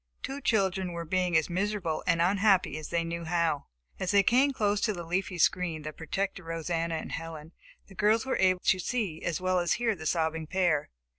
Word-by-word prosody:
Two 275 +1 -4
children 190 -6 +1
were 170 0 -5
being 180 0 +2
as 160 - +1
miserable 185 -2 -2
and 165 -1 +3
unhappy 195 -3 +3
as 155 - -8
they 170 -1 0
knew 170 0 -4
how. 165 -3 0 0.3
As 185 - -2
they 200 0 +5
came 260 +7 +4
close 210 -5 0
to 215 - +1
the 175 -3 -6
leafy 180 +2 -2
screen 165 -2 +1
that 155 0 -6
protected 195 +4 -3
Rosanna 165 0 -2
and 160 - -5
Helen, 160 -1 -6 0.3
the - - -15
girls 215 +4 +2
were 265 - 0
able 185 -1 +3
to 185 - +2
see 195 -6 -2
as 170 -3 -2
well 185 0 +1
as 175 -1 +1
hear 235 -1 +1
the 160 -5 -6
sobbing 160 -1 0
pair. 175 -4 +1
180 Hz, 205 wpm, -29 LUFS, 165-195 Hz, 0.3 s, they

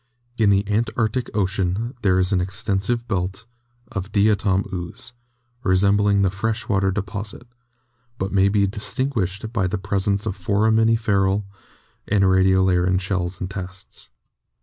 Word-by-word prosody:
In 110 -2 +4
the 100 +1 +2
Antarctic 110 +2 0
Ocean 100 +3 -1
there 95 -3 +3
is 90 +1 +1
an 95 -2 +2
extensive 100 +4 -1
belt 95 +1 -2 0.5
of 95 +1 -5
Diatom 100 -2 +2
ooze, 90 +6 -6 0.5
resembling 100 0 +3
the 95 - +2
fresh 110 +4 -2
water 95 -3 +2
deposit, 100 +3 -5 0.7
but 95 -1 -3
may 100 0 +4
be 100 0 +3
distinguished 110 0 -2
by 95 -5 +1
the 100 +3 -2
presence 100 +1 -1
of 105 -4 -2
foraminiferal 105 0 +2 0.6
and 100 -1 +2
radiolarian 95 -1 +3
shells 90 -2 -2
and 95 - -3
tests. 95 -1 -8
100 Hz, 125 wpm, -22 LUFS, 95-105 Hz, 0.7 s, In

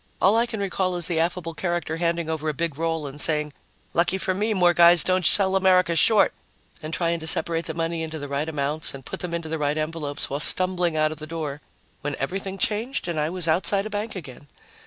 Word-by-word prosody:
All 195 +3 +4
I 235 +1 +2
can 225 -3 -5
recall 190 -2 -1
is 175 -2 0
the 165 -2 -1
affable 165 0 -2
character 170 -1 -3
handing 170 -1 -1
over 160 -1 -2
a 150 - -3
big 165 -1 -2
roll 165 -2 -1
and 145 +1 -5
saying, 150 -1 +1 0.4
"Lucky 175 +3 +1
for 190 0 -1
me 210 +4 -1
more 180 -4 +3
guys 170 -1 +7
don't 185 0 +1
sell 190 +3 +4
America 185 -2 +3
short," 215 +5 +4 0.5
and 155 - -6
trying 170 0 -1
to 160 - -5
separate 165 +1 +3
the 160 - -5
money 165 0 -2
into 160 0 -5
the 145 -1 -6
right 140 +3 -2
amounts 150 0 0
and 135 - -11
put - - -6
them 180 - -4
into 170 -1 -5
the 160 0 -3
right 145 +1 0
envelopes, 155 -2 -3
while 140 - -4
stumbling 180 0 +3
out 155 0 +1
the 155 0 -9
door, 155 -3 -5 0.4
when 145 0 -3
everything 190 +7 -4
changed 220 +6 -2
and 170 -3 -2
I 150 +1 0
was 180 -1 -1
outside 195 +5 +1
a 215 - -6
bank 210 +2 -4
again. 145 -5 -10
165 Hz, 225 wpm, -24 LUFS, 155-185 Hz, 0.5 s, guys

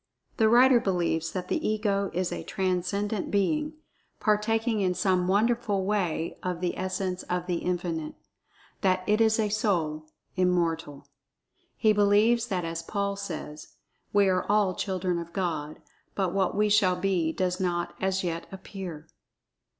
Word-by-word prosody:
The 220 -2 +4
writer 250 +2 +6
believes 170 -5 0
that 180 0 -4
the - - -1
Ego 205 -2 0
is 180 +1 -1
a - - -4
transcendent 190 +2 -1
Being, 300 +10 0 0.5
partaking 220 +1 +1
in 180 -2 +1
some 180 0 +1
wonderful 205 -1 +1
way 185 -5 -1
of 180 -2 -3
the 180 -1 -1
essence 185 0 -2
of 180 0 -1
The 180 -1 -1
Infinite—that 180 +2 -3
it 210 +1 +2
is 220 -1 +4
a 215 -1 +1
Soul—Immortal. 165 -4 -1 0.7
He 215 -1 +4
believes 210 +3 +3
that 185 -5 -2
as 165 0 -3
Paul 200 +3 -2
says, 160 -6 -7 0.4
"We 205 -1 +4
are 185 -1 +2
all 205 -2 +3
children 185 -2 -1
of 170 0 -8
God, 160 -6 -3 0.4
but 190 -3 0
what 190 -2 +1
we 210 0 +3
shall 200 -3 +4
be 180 -3 0
does 180 +2 -1
not 175 -2 -1
as 190 0 0
yet 170 -1 -3
appear." 185 -5 -8
185 Hz, 140 wpm, -27 LUFS, 175-205 Hz, 0.7 s, writer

